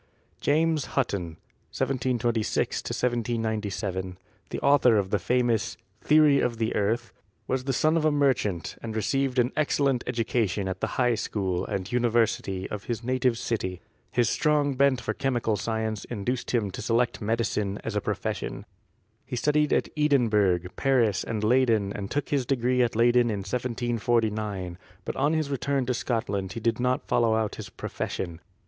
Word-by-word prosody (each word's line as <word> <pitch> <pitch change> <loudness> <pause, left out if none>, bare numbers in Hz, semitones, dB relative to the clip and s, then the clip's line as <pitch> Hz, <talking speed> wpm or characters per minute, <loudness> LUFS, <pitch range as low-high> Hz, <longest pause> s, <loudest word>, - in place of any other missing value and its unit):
James 155 0 +2
Hutton 90 -11 -1 0.3
(1726 120 -4 0
1797), 110 -6 -2 0.3
the - - -4
author 135 -5 +5
of 100 -1 -1
the 105 - +2
famous 120 +2 +1 0.3
"Theory 150 -2 +5
of 120 -3 0
the 110 -1 -1
Earth," 115 +3 0 0.3
was 130 -1 -1
the 135 - 0
son 155 +5 +2
of 165 - +1
a 155 - +4
merchant 130 - 0
and 110 -1 -5
received 135 +3 0
an 125 +1 +3
excellent 140 -4 +1
education 110 -4 0
at 95 0 -4
the - - -3
High 125 -1 +3
School 95 -4 -2
and 100 0 -3
University 115 -5 +1
of 105 -1 -5
his 120 -1 -3
native 125 -1 +1
city. 95 -7 -2 0.3
His 120 -2 +2
strong 150 -2 +2
bent 135 -1 +3
for 120 - -3
chemi 130 -4 -1
cal 110 - +1
science 110 -1 -2
induced 120 +3 -3
him 110 -5 0
to - - -6
select 115 +2 +1
medicine 105 -2 -1
as - - -4
a - - +1
profession. 100 - -3 0.6
He 130 - -5
studied 150 +5 +2
at - - +2
Edinburgh, 110 - +3 0.2
Paris 120 -9 +2
and 110 -2 -3
Leyden 110 -4 +3
and 100 -1 -5
took 145 -1 -2
his 135 -4 0
degree 125 -1 +2
at 120 -3 +1
Leyden 120 +1 +4
in 105 -3 -2
1749, 110 -5 -1 0.3
but - - -3
on 145 +3 +2
his 155 -3 0
return 140 0 0
to 125 - 0
Scotland 100 -6 -2
he 115 - -4
did 115 +1 0
not 125 +1 0
follow 115 -1 +3
out 110 -2 -1
his - - -7
profession. 85 -3 -5
120 Hz, 160 wpm, -27 LUFS, 105-130 Hz, 0.6 s, author